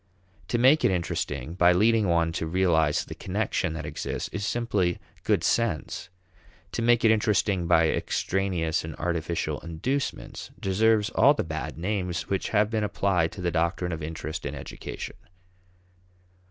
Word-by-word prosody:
To 120 - 0
make 130 +6 +5
it - - +5
interesting 85 -4 -2
by 90 0 +5
leading 110 +3 +3
one 85 -1 +2
to 80 0 -3
realize 80 -4 +2
the - - -7
connection 80 - -2
that 80 -2 -5
exists - - -4
is 105 - -4
simply 105 -6 0 0.3
good - - +2
sense; 100 -6 0 0.6
to - - -2
make 120 0 +4
it 110 - +7
interesting 105 -4 +1
by 80 -1 +5
extraneous 90 -2 0
and 80 -2 -6
artificial 85 -1 -2
inducements 115 - -3
deserves 110 +3 +2
all 140 +2 +5
the - - -1
bad 80 -1 -5
names 90 -1 -2
which 95 - -1
have 105 0 +2
been 110 -2 0
applied 95 -5 +1
to 95 - -8
the 90 -1 0
doctrine 85 +2 0
of 80 -1 -4
interest 80 0 -5
in - - -4
education. - - -7
90 Hz, 155 wpm, -26 LUFS, 80-105 Hz, 0.6 s, it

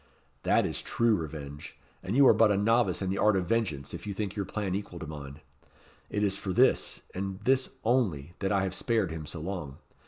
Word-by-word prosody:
That - - +3
is - - -3
true 115 -2 +2
revenge; 75 -3 -7 0.2
and 95 +4 -3
you 140 0 +7
are - - +8
but 110 -2 +5
a 100 - +2
novice 105 -2 +2
in 95 - -1
the 100 - -2
art 105 -1 +4
of 95 -2 0
vengeance 90 -10 -1
if - - -7
you 100 - -3
think 100 -1 -3
your 100 -2 -2
plan 100 -1 -3
equal 100 -2 -4
to 80 - -6
mine. 70 -1 -8 0.7
It 105 - -1
is 100 -1 +1
for 95 - -4
this - - +3
and 95 0 -4
this 130 +3 +2
only 95 - +1
that 95 0 -1
I 100 -1 +2
have 95 -1 -2
spared 110 -4 0
him 80 -2 -6
so 80 - -5
long. 85 -6 -5
95 Hz, 220 wpm, -29 LUFS, 80-105 Hz, 0.7 s, are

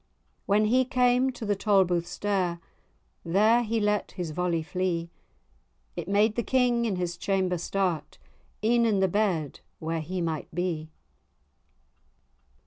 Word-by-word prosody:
When 210 +2 +3
he 250 +4 +3
came 250 0 +2
to 230 - -7
the 205 -1 +1
Tolbooth 190 -4 +2
stair, 185 -4 -1 0.6
There 215 +7 +4
he 230 -1 -1
let 210 -1 0
his 175 -3 -4
volley 170 0 -1
flee; 170 0 -2 0.8
It 175 -1 -5
made 210 +2 +2
the 235 - +1
King 245 -1 +2
in 210 -4 0
his 175 -1 -3
chamber 185 -2 0
start, 180 -3 -2 0.5
E'en 235 +2 +3
in 205 -3 +2
the 190 - +3
bed 180 -7 -1 0.2
where 165 0 -3
he 180 +4 -4
might 165 -3 -3
be. 170 -3 -2
190 Hz, 135 wpm, -27 LUFS, 170-215 Hz, 0.8 s, There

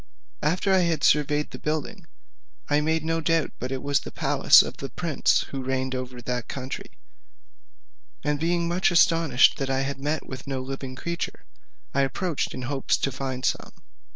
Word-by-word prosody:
After 180 +6 +1
I 190 - +5
had 170 -4 +1
surveyed 150 0 +2
the - - -8
building, 160 +4 -3 0.6
I 145 +1 +2
made 160 +1 0
no 165 0 0
doubt 165 -1 +1
but 130 +2 -4
it 135 -1 -3
was 140 0 +2
the - - -8
palace - - +5
of - - -7
the - - -6
prince - - +1
who 135 -1 -4
reigned 130 0 -1
over 130 -1 -5
that 125 0 -3
country: 135 0 -6 1.3
and 150 0 0
being 170 +1 +1
much 175 +2 +2
astonished 165 -6 +4
that 135 -1 -2
I 135 0 +1
had 135 0 -3
not - - -10
met 150 +1 -1
with 130 0 -8
one 130 -2 -3
living 135 -1 -6
creature, 170 +5 -5 0.5
I 140 - +2
approached 155 +4 -1
in 130 - -5
hopes 135 +1 0
to 135 - -1
find 130 -1 -4
some. - - -1
145 Hz, 180 wpm, -25 LUFS, 130-165 Hz, 1.3 s, I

